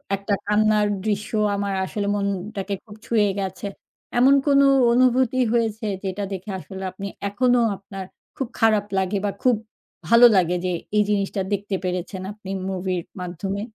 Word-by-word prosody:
একটা 200 Hz, +1 st, -2 dB
কান্নার 210 Hz, 0 st, +3 dB, 0.2 s
দৃশ্য 210 Hz, -1 st, -1 dB, 0.2 s
আমার 200 Hz, 0 st, -2 dB
আসলে 200 Hz, +1 st, -3 dB
মনটাকে 200 Hz, 0 st, -3 dB
খুব 210 Hz, -, -12 dB
ছুঁয়ে 215 Hz, -3 st, +2 dB
গেছে। 190 Hz, 0 st, -4 dB, 0.5 s
এমন 260 Hz, +3 st, +6 dB
কোনো 280 Hz, -1 st, +5 dB, 0.3 s
অনুভূতি 255 Hz, 0 st, +3 dB, 0.2 s
হয়েছে, 225 Hz, -1 st, 0 dB, 0.2 s
যেটা 195 Hz, +1 st, -3 dB
দেখে 190 Hz, +2 st, -6 dB
আসলে 190 Hz, +1 st, -8 dB
আপনি 195 Hz, +2 st, -6 dB, 0.2 s
এখনও 245 Hz, +4 st, +3 dB, 0.2 s
আপনার 195 Hz, 0 st, -8 dB, 0.3 s
খুব 265 Hz, -, -2 dB
খারাপ 215 Hz, -3 st, +3 dB
লাগে 190 Hz, +1 st, 0 dB
বা, -, -, +1 dB
খুব 250 Hz, -2 st, +5 dB, 0.5 s
ভালো 235 Hz, +1 st, +8 dB
লাগে 180 Hz, -2 st, +3 dB
যে, -, -, +1 dB, 0.3 s
এই 210 Hz, -, +5 dB
জিনিসটা 200 Hz, -1 st, 0 dB
দেখতে 200 Hz, 0 st, -2 dB
পেরেছেন 185 Hz, +1 st, -3 dB
আপনি 205 Hz, -2 st, -12 dB, 0.2 s
মুভির 185 Hz, -1 st, -2 dB, 0.2 s
মাধ্যমে? 185 Hz, +3 st, -4 dB
205 Hz, 150 wpm, -23 LUFS, 190-220 Hz, 0.5 s, ভালো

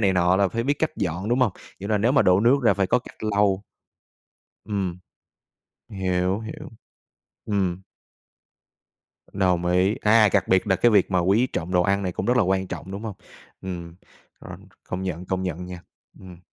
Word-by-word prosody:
này 100 Hz, -3 st, +3 dB
nọ 90 Hz, 0 st, +3 dB
là 100 Hz, 0 st, +3 dB
phải 115 Hz, +6 st, -2 dB
biết 140 Hz, +4 st, +1 dB
cách 160 Hz, -, 0 dB
dọn, 95 Hz, 0 st, -3 dB
đúng 120 Hz, +2 st, +1 dB
hông? 120 Hz, -7 st, +3 dB, 0.3 s
Kiểu 100 Hz, +2 st, -6 dB
là 105 Hz, -, +2 dB
nếu 115 Hz, +5 st, +2 dB
mà 135 Hz, -, +4 dB
đổ 90 Hz, +1 st, +4 dB
nước 120 Hz, +5 st, +5 dB
ra 115 Hz, -, +4 dB
phải 100 Hz, -1 st, +1 dB
có 125 Hz, -, +2 dB
cách 125 Hz, -, -14 dB
lau. 100 Hz, -2 st, +1 dB, 1.0 s
Ừm. 95 Hz, -4 st, -3 dB, 0.9 s
Hiểu, 95 Hz, 0 st, -1 dB
hiểu. 110 Hz, 0 st, -8 dB, 0.7 s
Ừm. 95 Hz, -3 st, -1 dB, 1.5 s
Đồng 90 Hz, -3 st, +1 dB
ý. 90 Hz, +3 st, +2 dB
À, 110 Hz, 0 st, +5 dB
cặc -, -, +1 dB
biệt 95 Hz, +2 st, +3 dB
là 95 Hz, -, +2 dB
cái 120 Hz, -, +4 dB
việc 100 Hz, -3 st, +3 dB
mà 95 Hz, -, +2 dB
quý 100 Hz, +8 st, +3 dB
trọng 90 Hz, -8 st, -5 dB
đồ 90 Hz, -, +4 dB
ăn 100 Hz, +2 st, +1 dB
này 90 Hz, -, -2 dB
cũng -, -, -4 dB
rất 125 Hz, +1 st, +2 dB
là 125 Hz, -, +4 dB
quan 95 Hz, 0 st, 0 dB
trọng, 90 Hz, -, -7 dB
đúng 100 Hz, +3 st, -6 dB
hông? 110 Hz, -3 st, -5 dB, 0.5 s
Ừm, 85 Hz, -3 st, -6 dB, 0.5 s
rồi, -, -, -9 dB, 0.3 s
công 90 Hz, +1 st, -4 dB
nhận, 90 Hz, -1 st, -4 dB
công 95 Hz, 0 st, -2 dB
nhận 90 Hz, -1 st, -4 dB
nha. 90 Hz, -1 st, -8 dB, 0.4 s
Ừm. 90 Hz, -2 st, -12 dB
95 Hz, 190 wpm, -24 LUFS, 90-105 Hz, 1.5 s, nước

